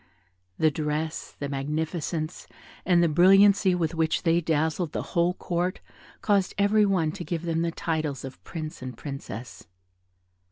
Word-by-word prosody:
The 155 -1 +3
dress, 155 +1 -3
the 145 - -3
magnificence, 155 +3 -3 0.4
and 175 -2 +5
the - - +4
brilliancy 190 +3 +5
with 165 -2 -1
which 160 -1 0
they 170 0 +3
dazzled 160 +1 0
the - - -2
whole 175 0 +2
court 180 0 -2 0.4
caused 200 -3 +1
every 205 +1 +4
one 175 -6 +1
to 180 +1 -7
give 170 -1 -3
them 165 -1 0
the 170 - +1
titles 155 -5 -2
of 135 - -10
prince 155 -3 -7
and 125 -2 -7
princess. 135 - -8
165 Hz, 150 wpm, -26 LUFS, 155-180 Hz, 0.4 s, and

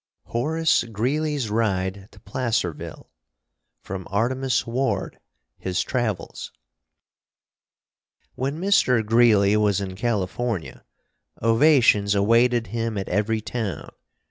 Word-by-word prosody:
_ - - -22
HORACE 155 +4 +1
GREELEY'S 130 +3 -1
RIDE 100 -3 -1
TO - - -17
PLACERVILLE 115 - -3 0.8
From 95 -1 -6
'Artemus 125 +6 0
Ward: 130 +3 -2 0.4
His 95 0 -1
Travels' 110 -9 -3 1.8
When 135 +4 -3
Mr. 130 - +3
Greeley 105 -3 +4
was 105 -2 +2
in 95 -2 -5
California, 105 -2 -2 0.6
ovations 115 -4 +4
awaited 115 +3 +3
him 115 -2 -2
at 95 - -4
every 110 +3 0
town. 105 -2 -5
115 Hz, 95 wpm, -23 LUFS, 100-125 Hz, 1.8 s, Greeley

